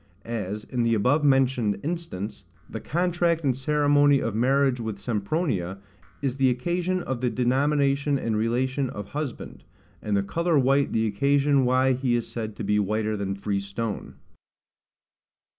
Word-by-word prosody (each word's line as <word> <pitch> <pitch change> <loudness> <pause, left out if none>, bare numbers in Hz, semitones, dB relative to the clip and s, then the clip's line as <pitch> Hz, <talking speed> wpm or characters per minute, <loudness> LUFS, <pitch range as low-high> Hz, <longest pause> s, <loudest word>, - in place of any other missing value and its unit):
As 105 -2 -4
in 125 +1 -3
the 115 -1 +2
above 125 +8 +2
mentioned 130 -7 +2
instance, 160 - -5 0.2
the - - -6
contract 175 0 0
and 135 -3 +1
ceremony 145 +1 +3
of 115 - -2
marriage 130 +3 +2
with 110 -3 -4
Sempronia 100 - -2 0.5
is 135 -1 -1
the 135 -1 +4
occasion 175 +8 -1
of 130 -2 -4
the 125 - +1
denomination 140 +3 +1
and 115 -4 -2
relation 130 +5 0
of 105 -1 -7
husband; 150 -4 -6 0.4
and 105 -1 0
the 100 - +1
colour 170 - 0
white 135 +1 +2
the 110 0 +1
occasion 140 +5 +2
why 130 +1 +3
he 125 -1 0
is 120 - -2
said 110 -2 -5
to - - -6
be 105 +1 +1
whiter 110 +1 0
than 100 -1 -3
free 100 0 -2
stone. 100 +2 -5
130 Hz, 155 wpm, -25 LUFS, 110-145 Hz, 0.5 s, the